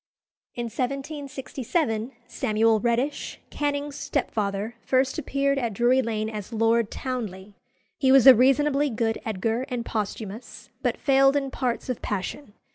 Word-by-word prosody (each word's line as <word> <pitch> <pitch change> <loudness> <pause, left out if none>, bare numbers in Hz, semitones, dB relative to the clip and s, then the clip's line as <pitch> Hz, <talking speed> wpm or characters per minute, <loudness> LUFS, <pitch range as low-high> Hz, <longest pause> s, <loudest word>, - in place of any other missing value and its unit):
In 240 - -3
1767 265 -1 -3 0.2
Samuel 220 -2 +2
Reddish, 240 +5 -1
Canning's 290 -1 -2
stepfather, 210 -5 -2
first 265 +3 +1
appeared 275 -1 0
at 235 -4 -2
Drury 245 +4 +3
Lane 220 -2 -2
as 215 -1 -6
Lord 225 0 +2
Townley. 210 -6 -5 0.5
He 265 -2 +4
was 270 -2 +7
a 265 - +12
reasonably 275 +4 +3
good 225 -1 -1
Edgar 225 +4 -1
and 245 -2 -3
Posthumus, 215 +1 -5
but - - 0
failed 270 -1 +4
in 275 -2 -1
parts 250 -3 -2
of 255 -3 -3
passion. 205 +4 -4
245 Hz, 130 wpm, -25 LUFS, 220-275 Hz, 0.5 s, a